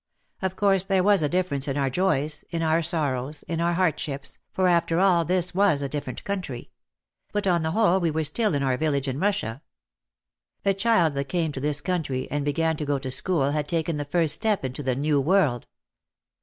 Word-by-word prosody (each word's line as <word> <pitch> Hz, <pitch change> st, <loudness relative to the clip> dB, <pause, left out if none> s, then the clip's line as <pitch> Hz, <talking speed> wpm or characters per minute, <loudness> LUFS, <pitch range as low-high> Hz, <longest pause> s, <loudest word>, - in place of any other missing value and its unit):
Of 190 Hz, -1 st, -2 dB
course 195 Hz, -2 st, +2 dB
there 190 Hz, -2 st, +2 dB
was 200 Hz, -2 st, +4 dB
a 150 Hz, -, +1 dB
difference 175 Hz, -6 st, -1 dB
in 135 Hz, 0 st, -2 dB
our 135 Hz, -2 st, 0 dB
joys, 155 Hz, -3 st, 0 dB
in 165 Hz, -1 st, -2 dB
our 160 Hz, +1 st, +2 dB
sorrows, 150 Hz, -4 st, -2 dB
in 165 Hz, -1 st, -3 dB
our 170 Hz, +1 st, +1 dB
hardships, 150 Hz, -6 st, -2 dB
for 185 Hz, -1 st, +1 dB
after 170 Hz, -1 st, +2 dB
all 180 Hz, -3 st, +4 dB
this 180 Hz, 0 st, +2 dB
was 185 Hz, -7 st, +2 dB
a -, -, -1 dB
different 135 Hz, -3 st, -5 dB
country; 180 Hz, -11 st, -5 dB, 0.6 s
but 205 Hz, -1 st, -2 dB
on 175 Hz, -3 st, +2 dB
the 160 Hz, -, -1 dB
whole 195 Hz, -4 st, +3 dB
we 170 Hz, -3 st, +1 dB
were 160 Hz, +1 st, -1 dB
still 210 Hz, +3 st, 0 dB
in 140 Hz, -, 0 dB
our 130 Hz, -2 st, +1 dB
village 140 Hz, -2 st, -1 dB
in 135 Hz, +1 st, -3 dB
Russia. 150 Hz, -, -1 dB, 1.0 s
A 195 Hz, -, +4 dB
child 195 Hz, -6 st, +2 dB
that 140 Hz, 0 st, -2 dB
came 170 Hz, -4 st, 0 dB
to 140 Hz, -, -6 dB
this 150 Hz, +1 st, -1 dB
coun 180 Hz, -2 st, -1 dB
try 130 Hz, -3 st, -4 dB
and 145 Hz, 0 st, -1 dB
began 160 Hz, +2 st, 0 dB
to 150 Hz, -, -3 dB
go 145 Hz, -1 st, 0 dB
to 130 Hz, -1 st, -4 dB
school 145 Hz, -2 st, +1 dB
had 150 Hz, 0 st, -2 dB
taken 165 Hz, -1 st, -1 dB
the 145 Hz, -, -2 dB
first 155 Hz, 0 st, +2 dB
step 210 Hz, -, +1 dB
into 130 Hz, +2 st, -5 dB
the 130 Hz, -3 st, -1 dB
New 145 Hz, +1 st, +1 dB
World. 150 Hz, -6 st, +1 dB
160 Hz, 210 wpm, -25 LUFS, 140-185 Hz, 1.0 s, was